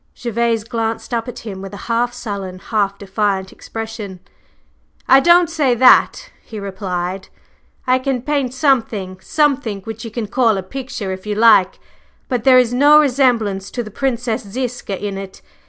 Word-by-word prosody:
Gervase 235 Hz, -1 st, -1 dB
glanced 230 Hz, +1 st, -3 dB
up 230 Hz, 0 st, -1 dB
at 245 Hz, -, -8 dB
him 195 Hz, -3 st, -6 dB
with 195 Hz, +1 st, -8 dB
a 200 Hz, -, -10 dB
half 240 Hz, +1 st, 0 dB
sullen, 200 Hz, -6 st, -6 dB
half 200 Hz, 0 st, -1 dB
defiant 195 Hz, -1 st, -2 dB
expression. 220 Hz, -4 st, -7 dB, 0.9 s
"I 265 Hz, -, +7 dB
don't 345 Hz, +4 st, +5 dB
say 295 Hz, -7 st, +1 dB
that," -, -, +4 dB
he 220 Hz, -, -8 dB
replied; 190 Hz, -1 st, -4 dB, 0.6 s
"I 255 Hz, 0 st, +3 dB
can 255 Hz, -2 st, -2 dB
paint 280 Hz, -3 st, -1 dB
something 225 Hz, -9 st, 0 dB
something 275 Hz, -9 st, 0 dB
which 225 Hz, +2 st, -8 dB
you 230 Hz, -, -6 dB
can 225 Hz, 0 st, -4 dB
call 225 Hz, -1 st, +2 dB
a 190 Hz, -, -4 dB
picture 235 Hz, -2 st, -6 dB
if 190 Hz, +2 st, -7 dB
you 210 Hz, -, -1 dB
like, 210 Hz, -4 st, +4 dB, 0.5 s
but 245 Hz, -3 st, -2 dB
there 260 Hz, -1 st, +7 dB
is 245 Hz, -1 st, +3 dB
no 290 Hz, +4 st, +6 dB
resemblance 245 Hz, -9 st, +1 dB
to 240 Hz, -, -4 dB
the 215 Hz, -, -10 dB
Princess 240 Hz, -1 st, -2 dB
Ziska 240 Hz, -1 st, -4 dB
in 200 Hz, -1 st, -4 dB
it. 195 Hz, -1 st, -10 dB
225 Hz, 165 wpm, -18 LUFS, 200-255 Hz, 0.9 s, I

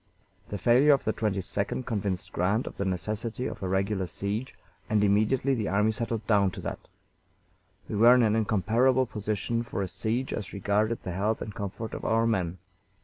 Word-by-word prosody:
The 105 Hz, -, -3 dB
failure 125 Hz, +9 st, +5 dB
of 135 Hz, -, +1 dB
the 110 Hz, -, 0 dB
22d 100 Hz, +3 st, -2 dB
convinced 100 Hz, -5 st, -2 dB
Grant 100 Hz, +7 st, +1 dB
of -, -, -7 dB
the 100 Hz, -, -1 dB
necessity 110 Hz, +6 st, -3 dB
of -, -, -5 dB
a 95 Hz, -, -2 dB
regular 95 Hz, 0 st, 0 dB
siege, 105 Hz, +8 st, -4 dB, 0.3 s
and 105 Hz, -1 st, +3 dB
immediately 110 Hz, +7 st, +2 dB
the 110 Hz, -5 st, -1 dB
army 105 Hz, +3 st, +2 dB
settled 115 Hz, -1 st, -2 dB
down 100 Hz, -3 st, +3 dB
to -, -, -7 dB
that. -, -, -4 dB, 1.1 s
We -, -, -4 dB
were 120 Hz, +4 st, +7 dB
in 125 Hz, -, +4 dB
an 110 Hz, -1 st, +3 dB
incomparable 115 Hz, +5 st, +2 dB
position 110 Hz, +1 st, -2 dB
for 115 Hz, -4 st, -3 dB
a -, -, -2 dB
siege 110 Hz, +8 st, -2 dB
as 105 Hz, -, -5 dB
regarded 105 Hz, +3 st, 0 dB
the 90 Hz, -, -4 dB
health 105 Hz, +5 st, 0 dB
and 105 Hz, -, -6 dB
comfort 100 Hz, +3 st, -5 dB
of -, -, -6 dB
our 115 Hz, +1 st, +2 dB
men. 95 Hz, -6 st, 0 dB
105 Hz, 185 wpm, -28 LUFS, 100-115 Hz, 1.1 s, were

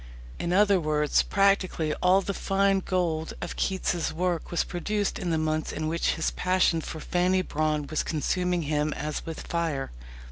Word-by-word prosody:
In 170 Hz, -, -2 dB
other 200 Hz, 0 st, +4 dB
words, 150 Hz, -2 st, +2 dB
practically 190 Hz, -5 st, +1 dB
all 185 Hz, +2 st, +5 dB
the 200 Hz, -, -3 dB
fine 195 Hz, 0 st, +2 dB
gold 170 Hz, -4 st, -1 dB
of 175 Hz, -, -5 dB
Keats's 185 Hz, -3 st, -1 dB
work 175 Hz, 0 st, -1 dB
was 170 Hz, -, +1 dB
produced 205 Hz, +4 st, -2 dB
in 180 Hz, -, -2 dB
the 165 Hz, -, +1 dB
months 155 Hz, 0 st, -1 dB
in 155 Hz, 0 st, -3 dB
which 165 Hz, +2 st, 0 dB
his 165 Hz, -, -1 dB
passion 180 Hz, -2 st, +2 dB
for 160 Hz, -, -6 dB
Fanny 180 Hz, +3 st, +1 dB
Brawne 155 Hz, -2 st, -1 dB
was 155 Hz, +2 st, -1 dB
consuming 180 Hz, +2 st, -1 dB
him 150 Hz, 0 st, 0 dB
as 150 Hz, +1 st, -4 dB
with 165 Hz, -, -5 dB
fire. 165 Hz, -5 st, -2 dB
170 Hz, 170 wpm, -27 LUFS, 155-185 Hz, -, all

